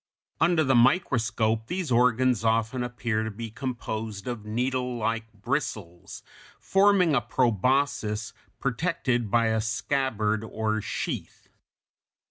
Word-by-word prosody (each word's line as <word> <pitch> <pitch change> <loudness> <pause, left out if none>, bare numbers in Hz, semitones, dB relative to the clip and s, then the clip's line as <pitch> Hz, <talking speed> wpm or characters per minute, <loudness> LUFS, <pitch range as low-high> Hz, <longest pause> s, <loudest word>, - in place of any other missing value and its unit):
Under 160 0 +3
the 135 -2 +2
microscope 115 -5 +2
these 180 -3 -3
organs 125 -1 +3
often 115 +3 +1
appear 120 -2 -2
to 110 - -3
be 110 +1 -7
composed 110 -4 -5
of 120 -4 -5
needlelike 120 -1 -1
bristles, 105 - -4 0.4
forming 195 -4 +4
a 130 - +3
proboscis 120 -1 0 0.3
protected 130 - -1
by 115 +1 +3
a 110 0 +1
scabbard 110 -1 -1
or 110 0 -2
sheath. 105 - -5
115 Hz, 105 wpm, -26 LUFS, 110-130 Hz, 0.4 s, forming